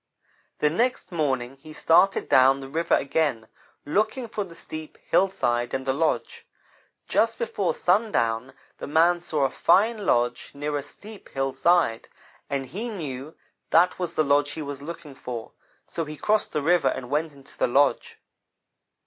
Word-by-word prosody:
The 150 - +2
next 235 0 0
morning 135 -6 -1
he 155 +3 -12
started 165 +5 +3
down 130 +1 +5
the 135 -1 -8
river 165 +4 +1
again, 140 -6 0 0.4
looking 215 - 0
for 215 -2 -3
the 170 -3 -12
steep 155 -1 -8
hillside 125 -11 +1
and 130 0 -3
the 135 - +1
lodge. 160 +3 -1 0.6
Just 225 0 +2
before 205 -5 -1
sundown, 135 - +1 0.3
the - - -6
man 170 +4 +3
saw 155 -4 -1
a 135 - -1
fine 210 - +2
lodge 120 0 +1
near 145 +1 -3
a 145 - -1
steep 205 +9 -12
hillside, 135 -1 +1 0.4
and 140 -1 -2
he 200 - -5
knew 150 - -6 0.3
that 180 +3 +4
was 175 -2 -3
the 155 - +3
lodge 145 0 +2
he 155 - -5
was 140 -1 -6
looking 165 -1 -8
for; 120 -3 -7 0.3
so 165 - -3
he 155 -1 -8
crossed 215 +8 +1
the 150 - -2
river 175 +2 +3
and 125 0 -3
went 155 +2 0
into 140 -1 -16
the - - +1
lodge. 140 +4 +2
155 Hz, 160 wpm, -25 LUFS, 135-175 Hz, 0.6 s, down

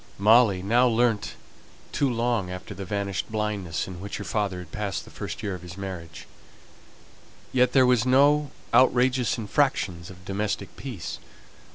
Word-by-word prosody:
Molly 105 -2 +5
now 120 +5 +4
learnt 115 -2 +1 0.6
to 140 - +1
long 115 -5 0
after 90 +2 -7
the 95 +1 -7
vanished 100 0 -3
blindness 105 -7 -2
in 90 -2 -8
which 100 0 -5
her 100 - -5
father 100 -3 -1
had 90 -3 -9
passed 105 -2 -3
the - - -14
first 100 +1 -6
year 100 -2 -2
of 90 - -7
his 90 0 -10
marriage; 95 -4 -7 1.3
yet 125 -1 +3
there 130 -2 +6
were 125 0 +5
no 145 +3 +4 0.2
outrageous 125 0 +3
infractions 105 -7 0
of 90 -1 -13
domestic 100 +1 -3
peace. 120 -11 -6
105 Hz, 155 wpm, -26 LUFS, 95-125 Hz, 1.3 s, there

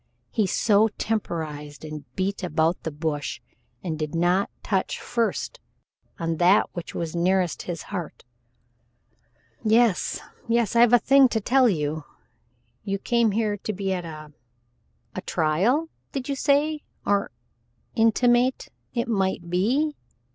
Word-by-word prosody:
So 215 +3 +4
he 215 - -11
temporized 155 -9 -3
and 155 -2 -7
beat 195 +2 -1
about 165 0 +1
the - - -3
bush, 150 -1 -3 0.4
and 160 -3 -3
did 155 +1 -3
not 175 +3 +2
touch 190 -2 -1
first 240 - -2 0.6
on 165 -1 -2
that 180 +4 +5
which 175 -2 -7
was 165 -1 -3
nearest 180 0 +1
his 170 -2 -4
heart. 175 -5 -5 1.4
"Yes, 225 -2 +3 0.3
yes. 235 -1 +1
I've 235 0 +6
a - - +10
thing 270 +2 +6
to 230 -2 -1
tell 250 +3 +4
you. 155 -4 -1 0.8
You 195 -1 -1
came 235 +2 +2
here 210 0 0
to 215 +2 -4
be 195 0 -2
at 180 -1 -3
a 155 -2 -9 0.8
a - - -4
trial 195 - +1 0.3
did 265 -2 -3
you 280 - -1
say, 295 +2 +2 0.2
or 200 0 +1 0.6
intimate 240 +3 +3 0.3
it 235 +1 0
might 190 -5 -1
be? 255 +12 +2
195 Hz, 135 wpm, -25 LUFS, 165-235 Hz, 1.4 s, a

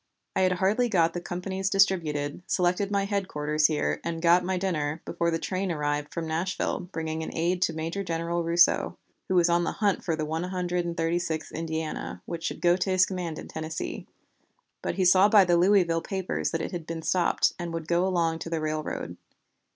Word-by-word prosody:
I - - +2
had 185 -1 +3
hardly 205 +7 +1
got 170 -5 +3
the 175 - -4
companies 190 +2 -3
distributed, 165 -7 +1
selected 180 +3 +1
my 200 -1 +1
headquarters 155 -7 +1
here, 155 -2 -1
and 170 -1 -3
got 175 +2 +4
my 185 +1 -1
dinner, 160 -5 -1
before 170 - -1
the 165 - 0
train 185 +2 -2
arrived 150 -1 -2
from 170 -1 -3
Nashville 175 +2 -2
bringing 160 -1 -3
an 160 - -4
aide 175 +2 0
to 165 - +2
Major 165 +5 -3
General 170 0 -2
Rousseau, 170 +1 +3 0.3
who 185 - 0
was 175 -1 +5
on 175 0 +2
the - - -1
hunt 205 -3 0
for 165 - 0
the 155 -1 -2
One 160 +2 -2
Hundred 180 -1 -2
and 170 0 -4
Thirty 165 +1 +1
sixth 160 -3 -3
Indiana, 160 -1 -4
which 170 -1 -5
should - - -3
go 175 0 +5
to 190 +1 -1
his 185 -1 +4
command 175 -4 -4
in - - -8
Tennessee, 160 0 -5 0.7
but - - -2
he 190 - +1
saw 185 +3 +6
by 205 -3 +7
the 175 -1 +3
Louisville 175 -2 +4
papers 190 0 -2
that 165 - -2
it - - -4
had 170 -3 -6
been 165 -1 -5
stopped, 180 0 +2
and 175 -1 -4
would 165 -1 -5
go 175 +1 +2
along 170 -3 +1
the 165 -1 -2
railroad. 155 0 -3
170 Hz, 205 wpm, -27 LUFS, 160-185 Hz, 0.7 s, by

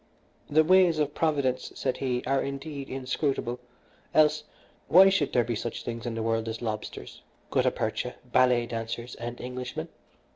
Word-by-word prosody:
"The 155 +2 +5
ways 180 -1 +5
of 150 -1 0
Providence," 140 -6 0
said 130 -2 -1
he, 125 -2 -1
"are 135 +1 +2
indeed 140 0 -5
inscrutable, 130 -1 -2 0.6
else 150 0 +4 0.4
why 190 +3 +8
should 175 -7 +1
there 120 - +3
be 120 +1 -2
such 115 +2 -4
things 115 0 -5
in 115 - -3
the 115 - -2
world 115 0 0
as 110 - -4
lobsters, 110 - -5 0.3
gutta - - +3
percha, - - -3
ballet 125 -2 +3
dancers, 115 +1 -5
and 120 +1 -6
Englishmen? 125 0 -5
130 Hz, 155 wpm, -28 LUFS, 120-145 Hz, 0.6 s, why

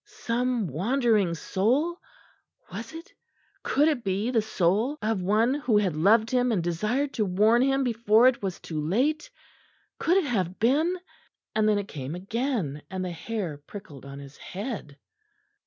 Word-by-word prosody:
Some 240 -1 -2
wandering 205 - +1
soul? 260 - 0 0.7
Was 220 +5 -6
it, 325 +1 -11 0.5
could 290 +3 +2
it 290 -7 0
be 200 +5 -1
the 230 -3 +3
soul 215 - 0
of 215 -5 -1
one 215 +7 +2
who 255 -7 +1
had 190 -6 +1
loved 215 +8 +4
him 250 -1 +2
and 190 -6 0
desired 215 - -1
to 220 - 0
warn 210 +5 +3
him 270 +1 +2
before 230 -1 +4
it 255 - +2
was 190 -3 -3
too 155 -2 -5
late? 260 - 0 0.7
Could 355 +3 +3
it 385 - +2
have 190 -8 -1
been 305 +10 +2 0.6
and 215 0 +2
then 210 - +3
it 200 -1 -3
came 145 -1 -6
again; 195 - -2
and 185 -1 -3
the 180 - -3
hair 175 -4 -4
prickled 145 -3 -11
on 140 0 -9
his 140 0 -11
head. 195 - -6
215 Hz, 160 wpm, -26 LUFS, 185-250 Hz, 0.7 s, loved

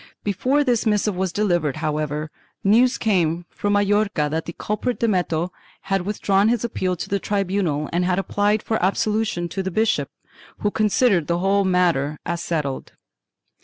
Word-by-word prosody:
Before 255 +9 +1
this 245 -4 +1
missive 210 -1 +1
was 185 0 -1
delivered, 175 -9 0
however, 155 0 -2 0.3
news 235 +6 +4
came 175 -6 +1
from 205 0 -1
Majorca 205 -6 +2
that 160 +1 -2
the 170 - -6
culprit 215 +4 -2
Dameto 180 -6 0 0.3
had 195 -1 -1
withdrawn 205 0 +2
his 235 -1 +1
appeal 185 -6 -1
to - - -6
the 200 - 0
tribunal 190 -7 -1
and 175 +1 +1
had 180 0 +1
applied 205 +2 +1
for 220 -5 -1
absolution 205 -2 0
to 195 - -3
the 190 - -2
bishop, 220 +4 +1 0.5
who 205 - +1
considered 210 -5 +2
the 170 - +1
whole 195 +2 +2
matter 170 -6 +1
as 170 0 -2
settled. 150 -5 -3
195 Hz, 160 wpm, -22 LUFS, 170-210 Hz, 0.5 s, news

